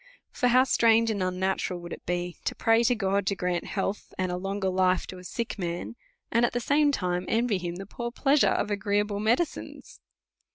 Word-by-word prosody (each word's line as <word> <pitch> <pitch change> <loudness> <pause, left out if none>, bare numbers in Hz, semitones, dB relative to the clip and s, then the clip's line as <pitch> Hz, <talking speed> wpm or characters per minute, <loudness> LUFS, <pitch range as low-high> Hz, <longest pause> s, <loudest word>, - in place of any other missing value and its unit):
For 250 - +1
how 250 +1 +5
strange 230 -3 +4
and 205 -3 -2
unna 185 +1 0
tural 180 -2 -3
would 175 0 -7
it - - -11
be 175 0 -2
to - - -1
pray 225 0 +3
to 245 - +3
God 195 -2 0
to 200 - +1
grant 180 -1 -2
health 195 0 -3
and 185 -1 -1
a - - -1
longer 195 +1 -2
life 185 0 +2
to 185 - -9
a - - -12
sick 230 +3 -4
man, 175 +5 -4 0.4
and 235 +1 +3
at 240 - +1
ihe 245 - -1
same 290 +4 +3
time 180 -7 -2
to - - -4
envy 225 -3 +1
him 175 -1 -4
the 195 +2 -7
poor 235 +4 -5
pleasures 275 +3 +3
of 210 - -1
agreeable 205 0 0
medicines 240 +10 -2
200 Hz, 215 wpm, -27 LUFS, 185-230 Hz, 0.4 s, how